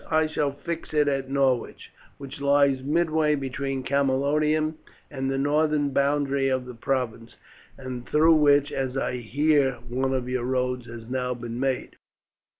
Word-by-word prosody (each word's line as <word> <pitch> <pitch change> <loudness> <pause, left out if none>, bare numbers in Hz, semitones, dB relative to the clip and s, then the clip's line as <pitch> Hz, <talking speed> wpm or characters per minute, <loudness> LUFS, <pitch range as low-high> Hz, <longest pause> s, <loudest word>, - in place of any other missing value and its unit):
I 160 0 +3
shall 150 -2 -1
fix 165 +2 -6
it 150 -1 +3
at 135 -2 -1
Norwich, 135 -3 0 0.3
which 140 +1 -9
lies 140 -1 +3
midway 155 +1 +1
between 135 -1 -3
Camalodunum 150 +3 +1 0.3
and 135 -2 -3
the 135 - -1
northern 145 +1 +1
boundary 140 -1 +1
of 130 -1 -1
the 125 - -8
province, 120 -2 -3 0.4
and 130 -2 -7
through 160 +2 +5
which, 145 -2 +4
as 135 -1 -2
I 125 - -1
hear, 140 +3 +2 0.2
one 130 +2 0
of 125 -1 -2
your 125 -1 -2
roads 125 -1 -1
has 115 -1 -9
now 125 0 -2
been 120 0 -6
made." 135 -1 -2
135 Hz, 150 wpm, -25 LUFS, 130-145 Hz, 0.4 s, through